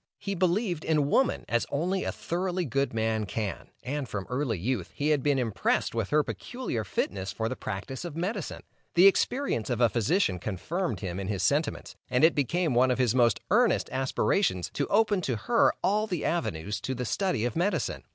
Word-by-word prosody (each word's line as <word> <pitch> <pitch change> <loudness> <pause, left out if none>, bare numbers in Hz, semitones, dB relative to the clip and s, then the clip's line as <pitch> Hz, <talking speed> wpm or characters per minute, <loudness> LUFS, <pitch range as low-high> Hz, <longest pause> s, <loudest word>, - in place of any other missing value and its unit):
He 200 -1 -4
believed 180 -1 0
in 150 -3 +1
woman 265 - +2
as 120 0 0
only 180 +7 0
a - - -1
thoroughly 180 +1 -2
good 135 +1 0
man 110 -1 0
can, 100 -1 -4
and 135 -1 -3
from 100 -3 -4
early 125 -4 0
youth, 100 0 -2
he 145 +1 0
had 150 -3 +3
been 145 0 +2
impressed 115 -5 0
with 115 -4 -1
her 150 0 +3
peculiar 240 - -4
fitness 95 0 -2
for 110 - -2
the 130 - -3
practice 110 - -5
of 170 -4 -6
medicine. 185 +2 -3 0.3
The 175 +2 +7
experience 195 - +2
of 120 -2 -1
a 120 -2 +5
physician 120 - +1
confirmed 160 - -3
him 90 -2 -4
in 95 - -4
his 95 -3 -2
sentiments, 145 - 0
and 125 +2 +2
it 160 - +7
became 155 +2 0
one 125 +2 +4
of 125 - +1
his 125 -3 +2
most 120 -4 +3
earnest 235 +3 +3
aspirations 130 - 0
to - - -1
open 205 -2 +3
to 130 -7 -1
her 230 - +3
all 210 +3 +2
the 180 -7 -2
avenues 100 - -2
to 130 +5 -3
the 125 0 -3
study 180 - 0
of 120 - -2
medicine. 175 - -1
135 Hz, 195 wpm, -28 LUFS, 110-180 Hz, 0.3 s, The